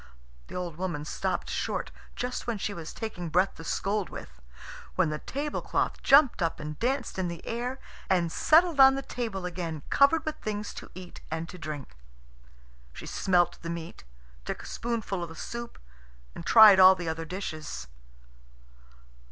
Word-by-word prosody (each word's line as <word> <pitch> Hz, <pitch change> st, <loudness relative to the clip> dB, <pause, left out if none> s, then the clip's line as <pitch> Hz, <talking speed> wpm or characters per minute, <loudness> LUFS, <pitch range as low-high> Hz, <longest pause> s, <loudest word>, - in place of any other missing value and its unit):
The -, -, -10 dB
old 175 Hz, -3 st, -4 dB
woman 170 Hz, -5 st, -3 dB
stopped -, -, -2 dB
short, -, -, -2 dB, 0.2 s
just 250 Hz, 0 st, -4 dB
when 235 Hz, -2 st, -1 dB
she 205 Hz, +1 st, -3 dB
was 165 Hz, -4 st, -7 dB
taking 180 Hz, -6 st, -5 dB
breath 180 Hz, +4 st, +2 dB
to 165 Hz, -, -11 dB
scold 200 Hz, +3 st, -1 dB
with, -, -, -10 dB, 0.5 s
when 170 Hz, -4 st, +2 dB
the 150 Hz, -, -3 dB
tablecloth 290 Hz, +2 st, -2 dB
jumped 275 Hz, -6 st, +5 dB
up 165 Hz, -1 st, 0 dB
and 150 Hz, 0 st, -6 dB
danced 250 Hz, -4 st, -1 dB
in 185 Hz, -, 0 dB
the 170 Hz, 0 st, -7 dB
air 245 Hz, +3 st, -3 dB, 0.3 s
and 175 Hz, -3 st, +2 dB
settled 325 Hz, -, +4 dB
on 270 Hz, 0 st, +9 dB
the 275 Hz, -, -3 dB
table 220 Hz, -8 st, -4 dB
again, 170 Hz, -4 st, -4 dB
covered 300 Hz, +3 st, +4 dB
with 310 Hz, 0 st, -3 dB
things 210 Hz, -1 st, -4 dB
to -, -, -9 dB
eat 180 Hz, -1 st, -10 dB
and 160 Hz, +1 st, -3 dB
to 180 Hz, -, -10 dB
drink. 150 Hz, -, -7 dB, 1.0 s
She -, -, -9 dB
smelt 180 Hz, -2 st, +1 dB
the 165 Hz, -, -6 dB
meat, 170 Hz, 0 st, -6 dB, 0.4 s
took -, -, -5 dB
a -, -, -10 dB
spoonful 225 Hz, -5 st, -3 dB
of 170 Hz, -, -4 dB
the 165 Hz, -, -10 dB
soup, 235 Hz, +7 st, -6 dB, 0.6 s
and -, -, -8 dB
tried 215 Hz, -4 st, +9 dB
all 185 Hz, 0 st, +9 dB
the 175 Hz, -2 st, -6 dB
other 160 Hz, 0 st, -2 dB
dishes. 160 Hz, -3 st, -5 dB
185 Hz, 170 wpm, -28 LUFS, 165-235 Hz, 1.0 s, on